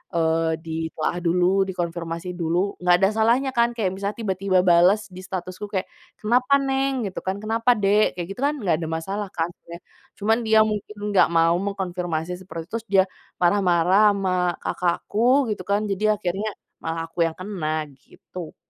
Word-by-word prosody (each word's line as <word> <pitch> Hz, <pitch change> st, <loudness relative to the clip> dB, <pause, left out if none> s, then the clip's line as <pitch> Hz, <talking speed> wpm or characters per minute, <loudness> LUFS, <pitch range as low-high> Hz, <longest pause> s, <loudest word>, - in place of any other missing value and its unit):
eee, 160 Hz, 0 st, +1 dB
ditelaah 160 Hz, +1 st, -3 dB
dulu, 180 Hz, +3 st, +2 dB
dikonfirmasi 170 Hz, 0 st, -4 dB
dulu, 175 Hz, +3 st, -1 dB
nggak 180 Hz, 0 st, +5 dB
ada 195 Hz, -, +6 dB
salahnya 235 Hz, +5 st, +2 dB
kan 235 Hz, 0 st, +3 dB
kayak, 190 Hz, -4 st, 0 dB
misalnya 200 Hz, +2 st, -4 dB
tiba-tiba 190 Hz, -1 st, +1 dB
balas 180 Hz, +5 st, +5 dB
di 180 Hz, -, -10 dB
statusku 185 Hz, +1 st, -6 dB
kayak, 190 Hz, -2 st, -1 dB, 0.3 s
"Kenapa, 250 Hz, +5 st, +2 dB
Neng?", 270 Hz, -3 st, 0 dB
gitu -, -, -5 dB
kan. 190 Hz, +1 st, -3 dB
"Kenapa, 230 Hz, +3 st, +2 dB
Dek?", 205 Hz, -1 st, +2 dB
kayak 175 Hz, -, -3 dB
gitu 220 Hz, -, -8 dB
kan, 290 Hz, +2 st, +1 dB
nggak 175 Hz, -, 0 dB
ada 160 Hz, -, -3 dB
masalah 195 Hz, +6 st, -3 dB
kan 165 Hz, 0 st, -2 dB
sebenarnya. 170 Hz, +1 st, -12 dB, 0.4 s
Cuman 220 Hz, +2 st, +2 dB
dia 220 Hz, 0 st, +5 dB
mungkin 210 Hz, -1 st, -4 dB, 0.2 s
nggak 190 Hz, -, +5 dB
mau 165 Hz, 0 st, +3 dB
mengkonfirmasi 180 Hz, -3 st, -3 dB
seperti 170 Hz, -3 st, -7 dB
itu, -, -, -40 dB
terus 225 Hz, -, -20 dB
dia 190 Hz, -1 st, +5 dB, 0.3 s
marah-marah 185 Hz, +2 st, +4 dB
sama 185 Hz, -3 st, 0 dB
kakak 175 Hz, -1 st, -1 dB
aku, 245 Hz, +2 st, +2 dB
gitu 200 Hz, -, -3 dB
kan, 205 Hz, +1 st, +1 dB
jadi 210 Hz, +2 st, +2 dB
akhirnya 200 Hz, +2 st, -2 dB, 0.3 s
malah 165 Hz, 0 st, -3 dB
aku 170 Hz, -, -10 dB
yang 160 Hz, -, -6 dB
kena, 160 Hz, -5 st, -3 dB, 0.2 s
gitu. 170 Hz, +3 st, -11 dB
190 Hz, 170 wpm, -23 LUFS, 170-210 Hz, 0.4 s, ada